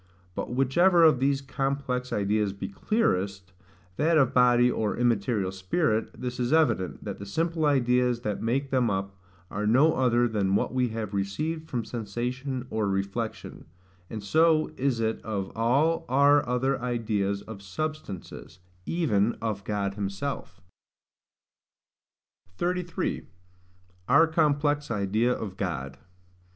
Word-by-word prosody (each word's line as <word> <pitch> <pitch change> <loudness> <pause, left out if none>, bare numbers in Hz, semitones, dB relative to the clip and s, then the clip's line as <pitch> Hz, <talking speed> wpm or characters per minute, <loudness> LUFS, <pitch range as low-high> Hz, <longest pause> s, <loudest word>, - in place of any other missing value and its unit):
But - - -4
whichever 165 +8 +4
of 155 -6 +6
these 135 +1 +1
complex 135 -2 -2
ideas 105 0 0
be 100 - -5
clearest, 100 - -1 0.4
that 160 +2 +3
of 135 -5 +3
body, 125 0 +5
or 110 -3 -1
immaterial 115 -4 +1
spirit, 110 - -1
this 125 0 -4
is 120 +1 0
evident, 155 - +1
that - - -6
the 100 - -7
simple 165 +6 0
ideas 125 -3 +2
that 105 -3 -3
make 135 +4 -1
them 125 -3 +2
up 95 0 -3 0.4
are 105 +1 -2
no 140 +8 +5
other 120 -2 +2
than 100 -4 0
what 110 - 0
we 130 -1 +2
have 110 -3 -5
received 155 +12 -3
from 120 -3 -2
sensation 125 +4 -4
or 110 -2 0
reflection: 100 +4 -4 0.4
and 110 -2 -6
so 155 +7 +3
is 130 -3 0
it 110 0 -1
of 100 -3 -4
all 135 +9 +2
our 140 +2 +5
other 130 +1 0
ideas 105 -5 -1
of 110 -3 -9
substances, 100 - -6 0.3
even 120 - +1
of 105 -3 -3
God 100 -1 -2
himself. 100 +7 -4 2.0
33. 180 0 -2 0.8
Our 165 - +7
complex 145 -2 +1
idea 110 +2 +1
of 100 -6 -4
God. 70 -8 -4
120 Hz, 130 wpm, -27 LUFS, 100-140 Hz, 2.0 s, Our